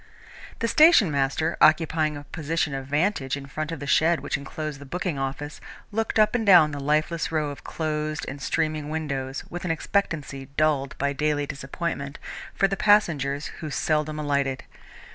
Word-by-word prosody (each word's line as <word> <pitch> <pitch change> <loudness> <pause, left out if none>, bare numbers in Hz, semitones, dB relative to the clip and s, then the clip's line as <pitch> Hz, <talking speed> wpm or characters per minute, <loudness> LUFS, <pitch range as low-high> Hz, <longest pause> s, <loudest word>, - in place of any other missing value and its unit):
The 230 - -1
station 305 - +6
master, 140 +4 0
occupying 155 -1 +3
a 145 - -8
position 160 0 -2
of 135 -1 -5
vantage 145 -2 0
in 140 - -8
front 155 +3 -4
of 165 - -5
the 145 - -6
shed 160 +4 +3
which - - -3
enclosed 145 +1 -5
the - - -9
booking 175 -1 -3
office, 135 +2 -4 0.3
looked 225 +2 -1
up 215 -1 +4
and 240 -2 +1
down 175 -7 +7
the 145 - -5
lifeless 155 +4 0
row 155 -2 0
of 140 - -10
closed 155 0 -3
and 140 +1 -6
streaming 155 -1 -1
windows, 140 -4 -3
with 175 - -5
an 180 - -3
expectancy 155 -5 -2
dulled 150 -3 +1
by 140 +1 0
daily 150 0 0
disappointment, 140 +1 -4 0.4
for 195 - +3
the 195 - -2
passengers 155 -10 +2 0.2
who 155 - -4
seldom 155 +1 0
alighted. 140 -3 -1
150 Hz, 170 wpm, -25 LUFS, 140-165 Hz, 0.4 s, down